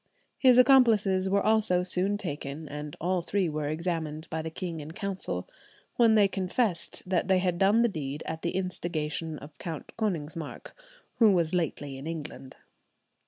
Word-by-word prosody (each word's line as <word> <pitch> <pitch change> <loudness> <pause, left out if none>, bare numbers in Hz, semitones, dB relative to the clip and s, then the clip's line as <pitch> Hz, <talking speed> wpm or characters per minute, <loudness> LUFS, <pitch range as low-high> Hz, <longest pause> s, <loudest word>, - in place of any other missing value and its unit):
His 255 -2 +6
accomplices 220 -8 +5
were 200 +1 +2
also 215 -5 +3
soon 185 +3 +1
taken, 150 -4 -5
and 150 0 -6
all 180 +1 0
three 190 +2 0
were 150 -2 -2
examined 160 0 -3
by 160 -1 -2
the 160 - -4
king 170 0 -5
in 155 +2 -8
Council, 190 - -3 0.5
when 230 -2 +5
they 205 -2 +6
confessed 190 0 -1
that 180 -1 0
they 190 -1 +4
had 180 -2 0
done 205 +4 +4
the - - +4
deed 150 -7 -5
at 160 0 -5
the 170 - -2
instigation 165 -4 -2
of 145 +1 -12
Count 165 -3 -7
Konigsmark, 165 -7 -4 0.5
"who 225 -3 +7
was 170 -3 +1
lately 145 -6 -2
in 140 - -7
England." 155 -5 -7
175 Hz, 165 wpm, -28 LUFS, 155-195 Hz, 0.5 s, who